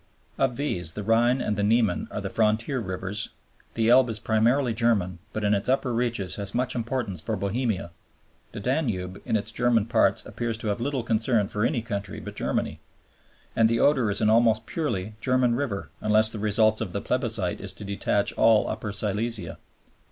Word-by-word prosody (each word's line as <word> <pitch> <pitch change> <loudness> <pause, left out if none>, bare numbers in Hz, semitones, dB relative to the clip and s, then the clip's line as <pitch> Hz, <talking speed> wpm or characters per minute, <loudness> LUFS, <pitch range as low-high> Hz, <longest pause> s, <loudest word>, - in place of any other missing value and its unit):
Of 130 -3 +2
these, 90 - -1
the 105 - -5
Rhine 120 +4 +3
and 105 - -1
the 100 - -1
Niemen 110 -3 +2
are - - -4
frontier 110 +4 +1
rivers, 95 0 -4 0.5
the 115 -1 +1
Elbe 125 0 +6
is 110 - -3
primarily 115 +4 +2
German 105 -6 +1
but 110 - -4
in 105 0 +3
its 100 +4 0
upper 130 -1 +1
reaches 115 -6 -1
has 100 -1 -4
much 125 +1 +1
importance 115 - -2
for 110 - -2
Bohemia, 100 -2 -2 0.6
the 110 - -7
Danube 105 - -2
in - - 0
its 110 +1 -1
German 115 -2 +2
parts - - +2
appears 115 -2 -3
to 110 -1 -3
have 100 +3 -2
little 135 -1 -1
concern 110 -1 +1
for 105 - -1
any 115 -1 0
country 100 -3 -4
but - - -8
Germany, - - -2 0.8
and 115 -1 +4
the 115 0 +1
Oder 135 -7 +3
is 100 +1 0
an 110 - +3
almost 115 -1 +3
purely 110 - -3
German 125 -1 +2
river 120 -6 -3
unless 110 +1 +4
the 110 - -6
result 110 +1 +2
of 90 - -4
the 100 - -2
plebiscite 115 -8 -1
is 100 0 -5
to 105 - -9
detach 100 0 0
all 110 -1 +4
Upper 110 -1 -4
Silesia. 105 +2 -2
110 Hz, 185 wpm, -26 LUFS, 100-120 Hz, 0.8 s, Elbe